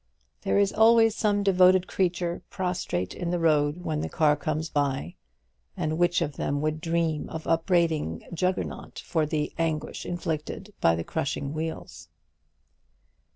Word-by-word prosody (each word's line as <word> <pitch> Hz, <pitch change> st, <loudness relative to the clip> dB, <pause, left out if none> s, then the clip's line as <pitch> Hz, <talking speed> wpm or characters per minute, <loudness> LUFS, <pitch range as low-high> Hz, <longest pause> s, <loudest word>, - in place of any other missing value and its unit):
There -, -, +1 dB
is 200 Hz, 0 st, +3 dB
always 225 Hz, 0 st, +5 dB
some 205 Hz, -2 st, +1 dB
devoted 185 Hz, -1 st, +5 dB
creature 175 Hz, -2 st, -1 dB
prostrate 180 Hz, -, -2 dB
in 175 Hz, -2 st, -4 dB
the 175 Hz, -, 0 dB
road 155 Hz, 0 st, +2 dB
when 155 Hz, -2 st, -2 dB
the -, -, -3 dB
car 150 Hz, -2 st, +3 dB
comes 155 Hz, +2 st, -2 dB
by; 135 Hz, -, -1 dB, 0.6 s
and 155 Hz, +1 st, -1 dB
which 175 Hz, -1 st, +3 dB
of 145 Hz, -4 st, -5 dB
them 145 Hz, -, -1 dB
would 155 Hz, +1 st, -1 dB
dream 165 Hz, -2 st, -1 dB
of 160 Hz, -, -6 dB
upbraiding 165 Hz, -, +1 dB
Juggernaut 180 Hz, +2 st, -2 dB
for 160 Hz, -3 st, 0 dB
the 150 Hz, -1 st, -2 dB
anguish 160 Hz, -2 st, -2 dB
inflicted 175 Hz, +4 st, -4 dB
by 85 Hz, -, +4 dB
the 85 Hz, -, -3 dB
crushing 140 Hz, -, -3 dB
wheels? 155 Hz, -, -5 dB
160 Hz, 145 wpm, -27 LUFS, 150-180 Hz, 0.6 s, always